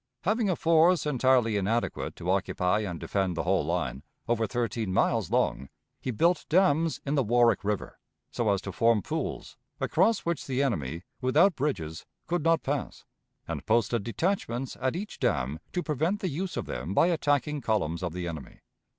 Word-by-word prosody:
Having 215 +2 +1
a 185 - +2
force 165 +2 +4
entirely 130 -5 +3
inadequate 110 +4 -1
to 90 - -2
occupy 95 0 +1
and 90 -6 -4
defend 95 -3 -1
the - - 0
whole 95 -1 +2
line, 75 -5 -2 0.3
over 115 -1 +1
thirteen 115 -1 -2
miles 95 - +1
long, 70 - 0 0.3
he - - -5
built 170 +10 +1
dams 165 -2 +3
in 140 - -1
the 145 - +3
Warwick 120 -2 +3
River, 105 0 -3 0.3
so 115 -3 0
as 100 -1 +1
to 100 - -5
form 115 +1 +2
pools, - - -4 0.2
across 215 +7 +2
which 170 -3 -3
the 135 0 +1
enemy, 85 - -2 0.2
without 155 +9 +4
bridges, 85 - -3 0.2
could 175 -2 -1
not 165 0 +3
pass, 140 +1 -3 0.4
and - - -4
posted 115 0 +2
detachments 125 - -2
at 130 +4 0
each 205 +4 -6
dam 70 +5 0
to 180 - -2
prevent 160 +7 0
the 190 - -1
use 175 +6 -4
of - - -2
them 75 +11 -4
by - - +5
attacking 150 -3 +1
columns 100 -8 0
of 90 -2 -2
the 90 +1 -4
enemy. 80 -4 -8
120 Hz, 175 wpm, -28 LUFS, 95-160 Hz, 0.4 s, by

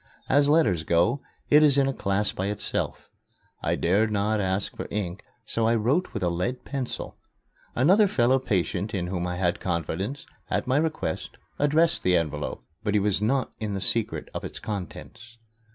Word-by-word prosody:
As 145 +1 +4
letters 115 - +3
go, 85 - +2 0.3
it 150 - +8
is 145 -2 +6
in 135 -1 +4
a 135 - 0
class 100 -2 0
by 95 - -3
itself. 105 0 -3 0.5
I - - +1
dared 105 +6 +2
not 105 +1 +1
ask 95 +1 -1
for - - -5
ink, 100 -3 -3 0.2
so 110 +1 0
I 115 - +3
wrote 130 +11 +1
with 105 - -4
a 90 - +2
lead 90 +9 -2
pencil. 135 -3 -5 0.6
Another 190 - +5
fellow 130 -5 +3
patient 100 -2 -1
in 90 -2 -1
whom 90 -1 -2
I 90 - -3
had 90 -1 0
confidence, 95 - -3 0.2
at - - 0
my 130 +2 +2
request, 155 - -2 0.2
addressed 160 +4 +3
the 90 -1 +3
envelope; 75 -6 -3 0.2
but 105 -1 0
he - - +5
was 100 -1 +1
not 130 +4 +1
in 105 -2 -3
the - - -2
secret 115 +3 0
of - - -5
its - - -6
contents. 110 +3 -7
105 Hz, 180 wpm, -26 LUFS, 95-135 Hz, 0.6 s, it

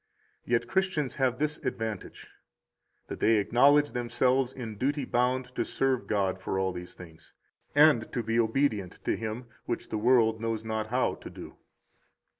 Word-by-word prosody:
Yet 120 -1 +1
Christians 185 -5 0
have 125 -2 +2
this 150 0 -1
advantage, 110 -3 -5 0.8
that - - -7
they 115 - +4
acknowledge 140 +8 +4
themselves 125 +1 +1
in 115 -5 -7
duty 140 +2 0
bound 125 +1 0
to - - -1
serve 135 -2 -1
God 95 -3 0
for 95 - -2
all 95 -1 0
these 90 0 -8
things, 80 -2 -14 0.4
and 145 -7 +5
to 120 - -2
be 115 +1 0
obedient 110 -5 0
to - - +1
Him 110 +2 -5 0.2
[which 120 - -4
the 110 - -2
world 110 -1 +3
knows 115 -1 -2
not 110 -1 -2
how 125 +3 +1
to - - -10
do]. - - -10
120 Hz, 160 wpm, -28 LUFS, 110-130 Hz, 0.8 s, and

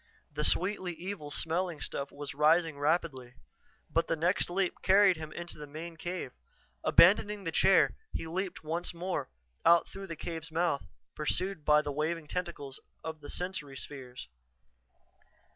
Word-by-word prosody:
The 150 +1 -2
sweetly 185 +1 +2
evil 180 -4 -6
smelling 165 +2 -1
stuff 140 - -4
was 145 0 -6
rising 155 +1 +3
rapidly. 145 -5 0 0.6
But 165 0 +2
the - - +1
next 170 +3 +1
leap 185 +1 -1
carried 195 0 +6
him 155 -1 -7
into 175 -1 -7
the 150 - -7
main 165 +3 -7
cave. 175 -4 -4 0.5
Abandoning 205 +3 +5
the 165 - -2
chair, 190 +4 +5 0.2
he - - -3
leaped 180 +2 -3
once 170 +3 -2
more, 180 - -2 0.3
out 170 0 +6
through 195 0 -8
the 165 - -5
cave's 160 0 -6
mouth, 165 -3 0 0.3
pursued 180 +3 -1
by 150 0 +5
the 145 - -3
waving 155 +3 -1
tentacles 145 -6 -4 0.2
of 160 -1 -5
the 145 - -9
sensory 165 -7 -4
spheres. 125 - -8
165 Hz, 150 wpm, -31 LUFS, 150-180 Hz, 0.6 s, carried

